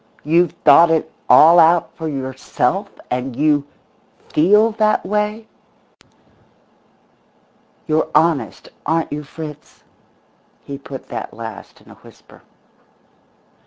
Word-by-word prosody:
You've 170 +2 +2
thought 160 +3 +7
it 160 -1 0 0.2
all 170 +3 +7
out 165 +1 +3
for 160 - -6
yourself 135 +7 -3 0.2
and 125 0 -3
you 145 0 +1 0.6
feel 210 +8 +3
that 215 0 +1
way? 210 +2 -2 2.4
You're 155 0 0
honest, 155 -7 0
aren't 160 -2 -1
you, 150 - -4
Fritz?" 150 0 -11 0.8
He 140 -1 -8
put 135 -1 -10
that - - -7
last 115 -2 -10
in - - -18
a - - -18
whisper. - - -19
155 Hz, 105 wpm, -18 LUFS, 140-170 Hz, 2.4 s, thought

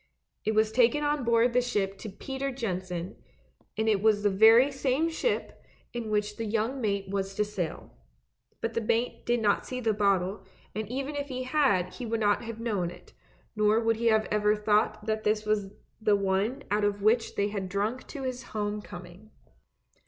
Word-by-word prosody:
It 220 - 0
was 215 0 +3
taken 245 +5 +3
on 295 -2 0
board 235 +1 +3
the 250 - +4
ship 200 -5 -1
to 215 - -6
Peter 270 +7 -4
Jensen, 185 -7 -4 0.6
and 220 0 0
it 210 -3 +3
was 210 -1 +3
the 205 - +3
very 225 +7 +6
same 270 +4 0
ship 395 +9 -2 0.3
in 235 -2 -4
which 210 0 -1
the 230 - -3
young 225 +5 -1
mate 200 -3 -1
was 195 0 -2
to 210 - +1
sail. 190 -6 -5 0.7
But 230 0 -2
the 230 - 0
mate 230 +2 -1
did 240 -1 +2
not 205 -1 +2
see 255 - -4
the 225 -3 +1
bottle, 195 -1 +1 0.3
and 215 0 -4
even 275 +4 -3
if 285 0 -3
he 255 -2 -4
had 255 -10 +2
he 245 - -6
would 225 0 -1
not 205 -1 +2
have 230 -1 -6
known 205 -7 -1
it, - - -14 0.4
nor 215 +1 +3
would 225 -1 +1
he 230 0 +2
ever 210 -1 +2
have 210 0 -12
thought 215 0 +2
that 220 -1 -1
it 215 0 +1
was 210 -2 0 0.3
the 215 -2 +4
one 200 +7 0
out 210 0 +2
of 205 -1 0
which 225 +2 +2
they 205 +1 +1
had 195 -3 -4
drunk 210 +6 -2
to 280 -3 -7
his 255 -1 -3 0.2
home 210 0 -1
coming. 180 +2 -11
215 Hz, 195 wpm, -28 LUFS, 205-240 Hz, 0.7 s, very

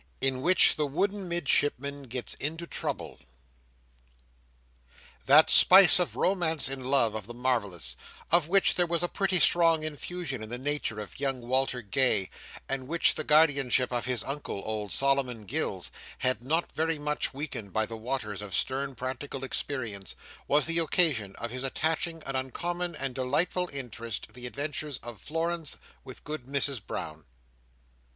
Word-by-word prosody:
In 130 -1 +1
which 185 +6 +6
the 150 -1 0
Wooden 195 +6 -2
Midshipman 140 -4 0
gets 125 0 -3
into 160 +4 -3
Trouble - - -4 2.1
That 150 +4 +7
spice 185 -2 +8
of 180 - -1
romance 170 -6 +1
and 135 -1 -5
love 130 -4 +3
of 110 -2 -6
the 120 - -9
marvellous, 100 - -1 0.4
of 170 -2 +4
which 195 +2 +3
there 175 -1 +2
was 170 0 0
a - - +3
pretty 190 0 +1
strong 165 0 +5
infusion 155 -3 -5
in 110 - -7
the 120 - -4
nature 135 -5 -3
of 105 +3 -8
young 135 -2 -1
Walter 130 0 0
Gay, 100 -2 +1 0.4
and 135 -1 -2
which 170 +3 +3
the 155 - -3
guardianship 140 -5 +3
of 120 -1 -1
his 125 -4 -1
Uncle, 140 -8 -5
old 105 -2 -3
Solomon 135 -5 +1
Gills, - - -3 0.3
had 130 -1 0
not 160 +6 0
very 160 0 -1
much 150 0 -2
weakened 135 -8 -6
by 110 +2 +1
the 115 - -6
waters 110 -3 -4
of 100 -4 -5
stern 135 +4 -1
practical 130 +2 -5
experience, 115 -8 -4 0.3
was 150 +1 +3
the 165 +1 +1
occasion 150 - +2
of 115 - -5
his 130 +1 -5
attaching 160 +3 -2
an 135 - -4
uncommon 175 +6 -3
and 135 -3 -4
delightful 150 +8 0
interest 115 -5 -5
to - - -12
the 125 0 -6
adventure 145 +3 -4
of 120 -2 -8
Florence 165 0 -3 0.3
with 130 - -11
Good 150 -4 -6
Mrs 140 -3 0
Brown. 80 0 -6
135 Hz, 160 wpm, -28 LUFS, 125-160 Hz, 2.1 s, spice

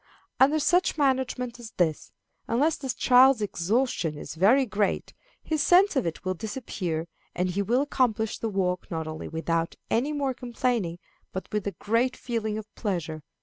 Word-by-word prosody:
Under 280 +4 +5
such 350 +3 +2
management 260 -3 0
as 230 -2 -10
this, 160 -4 0 0.4
unless 290 +7 +2
the 265 - -7
child's 255 +1 +5
exhaustion 200 - 0
is 150 - -7
very 215 - +4
great, 210 -3 -1 0.3
his 310 -2 0
sense 365 +4 +5
of 260 -9 +1
it 165 - -5
will 185 - 0
disappear, 180 -6 -4 0.3
and 180 0 0
he 200 +3 -1
will 240 +7 +2
accomplish 230 -6 0
the 225 - -2
walk 185 -3 -1
not 160 -1 -3
only 155 0 -6
without 165 +1 -1 0.2
any 255 +6 +1
more 280 -3 -1
complaining, 240 -7 -1 0.3
but 190 - -5
with 210 -2 -1
a 200 - -2
great 230 +8 0
feeling 220 -3 -2
of 220 - -5
pleasure. 170 -7 -3
220 Hz, 165 wpm, -27 LUFS, 180-260 Hz, 0.4 s, Under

